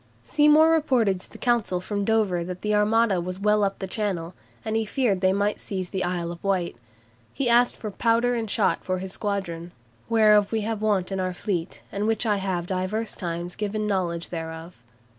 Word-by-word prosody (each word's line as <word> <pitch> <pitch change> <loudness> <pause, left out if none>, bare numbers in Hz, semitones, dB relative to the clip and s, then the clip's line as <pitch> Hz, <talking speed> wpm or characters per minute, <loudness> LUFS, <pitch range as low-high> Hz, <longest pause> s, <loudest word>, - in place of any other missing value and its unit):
Seymour 300 +2 +5
reported 250 - +2
to - - -12
the - - -11
Council 235 -7 +1
from 200 +2 -3
Dover 200 -5 +1
that 180 +1 -6
the 210 0 0
Armada 210 -2 +3
was 180 +1 -5
well 210 +1 +2
up 195 0 -1
Channel, 185 -4 -2 0.3
and 220 - -1
he 225 - +2
feared 215 -4 0
they 185 -1 +4
might 205 +2 0
seize 185 -3 -4
the 190 - -1
Isle 175 -1 -2
of 170 - -10
Wight. 190 -3 0 0.6
He 275 - -2
asked 240 +1 +4
for 215 - -5
"powder 235 +3 +2
and 225 -3 -2
shot" - - +1
for 185 0 -1
his 185 +1 -5
squadron 180 -5 -3 0.4
"whereof 210 -2 +5
we 220 -1 0
have 215 0 -3
want 200 -4 +1
in 190 - -2
our 185 -1 -2
fleet, 180 -3 -3
and 205 +2 -1
which 225 +1 +1
I 210 -2 +2
have 190 -3 -2
divers 190 +5 -2
times 175 -1 -4
given 215 0 -2
knowledge 175 -4 -1
thereof." 165 0 -6
200 Hz, 195 wpm, -25 LUFS, 180-220 Hz, 0.6 s, Seymour